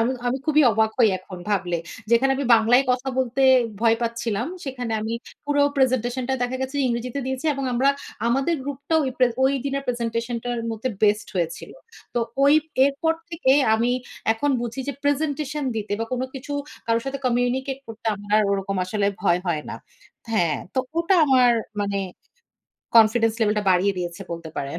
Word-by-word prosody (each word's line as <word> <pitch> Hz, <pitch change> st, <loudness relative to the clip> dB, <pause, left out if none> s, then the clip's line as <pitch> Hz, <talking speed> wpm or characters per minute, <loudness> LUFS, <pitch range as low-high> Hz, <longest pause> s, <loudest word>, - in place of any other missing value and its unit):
আমি 235 Hz, +3 st, +2 dB
আমি 250 Hz, +2 st, 0 dB
খুবই 310 Hz, -1 st, +4 dB
অবাক 220 Hz, +1 st, +2 dB
হই 235 Hz, -3 st, +6 dB
এখন 185 Hz, 0 st, -10 dB
ভাবলে। 180 Hz, -4 st, 0 dB, 0.3 s
যেখানে 240 Hz, +3 st, +4 dB
আমি 280 Hz, -, -2 dB
বাংলায় 230 Hz, +4 st, +4 dB
কথা 250 Hz, +1 st, 0 dB
বলতে 260 Hz, +1 st, 0 dB, 0.4 s
ভয় 230 Hz, -1 st, +4 dB
পাচ্ছিলাম। 230 Hz, -1 st, -2 dB, 0.2 s
সেখানে 250 Hz, -4 st, -4 dB
আমি 220 Hz, +1 st, -3 dB, 0.3 s
পুরো 290 Hz, 0 st, +2 dB
প্রেজেন্টেশন 255 Hz, -1 st, +1 dB
টা 265 Hz, -, +1 dB
দেখা 245 Hz, +1 st, -1 dB
গেছে 265 Hz, +2 st, -4 dB
ইংরেজিতে 245 Hz, +2 st, -2 dB
দিয়েছি। 265 Hz, +3 st, -3 dB
এবং 275 Hz, 0 st, -3 dB
আমরা 255 Hz, +3 st, +2 dB, 0.4 s
আমাদের 270 Hz, +7 st, +1 dB
গ্রুপটাও 285 Hz, +3 st, -1 dB
ওই 265 Hz, -, -1 dB
প্রে 255 Hz, -, +6 dB, 0.2 s
ঐ -, -, +5 dB, 0.2 s
দিনের 275 Hz, 0 st, -2 dB
প্রেজেন্টেশনটার 235 Hz, 0 st, -2 dB
মধ্যে 225 Hz, +3 st, -3 dB
বেস্ট 210 Hz, 0 st, +2 dB
হয়েছিল। 170 Hz, -2 st, -3 dB, 0.4 s
তো 240 Hz, -, +1 dB, 0.2 s
ঐ -, -, +6 dB, 0.4 s
এরপর 320 Hz, +4 st, 0 dB, 0.2 s
থেকে 315 Hz, -6 st, +2 dB, 0.2 s
আমি 235 Hz, +2 st, +1 dB, 0.4 s
এখন 285 Hz, +6 st, 0 dB
বুঝি 240 Hz, +2 st, -4 dB
যে 280 Hz, -, 0 dB
প্রেজেন্টেশন 290 Hz, 0 st, -1 dB
দিতে 210 Hz, -1 st, -3 dB
বা -, -, 0 dB
কোন 250 Hz, -, -1 dB
কিছু 275 Hz, +2 st, -7 dB, 0.3 s
কারো 230 Hz, 0 st, +2 dB
সাথে 270 Hz, 0 st, -3 dB
কমিউনিকেট 255 Hz, +2 st, 0 dB
করতে 225 Hz, 0 st, -10 dB
আমার 205 Hz, 0 st, -11 dB
আর 215 Hz, -, +3 dB
ওরকম 195 Hz, 0 st, -2 dB
আসলে 200 Hz, +2 st, -1 dB, 0.2 s
ভয় 175 Hz, -3 st, +3 dB
হয় 160 Hz, -4 st, 0 dB
না। -, -, -5 dB, 0.6 s
হ্যাঁ, 170 Hz, -8 st, +2 dB, 0.2 s
তো -, -, 0 dB, 0.2 s
ওটা 340 Hz, +3 st, +3 dB
আমার 255 Hz, -3 st, +5 dB, 0.3 s
মানে 200 Hz, -1 st, -1 dB, 1.0 s
confidence 225 Hz, 0 st, +5 dB
level 210 Hz, -1 st, +2 dB
টা -, -, -1 dB
বাড়িয়ে 190 Hz, +2 st, +2 dB
দিয়েছে 175 Hz, -1 st, -5 dB
বলতে 165 Hz, -1 st, -7 dB
পারেন। 140 Hz, +4 st, -4 dB
240 Hz, 170 wpm, -23 LUFS, 215-265 Hz, 1.0 s, হই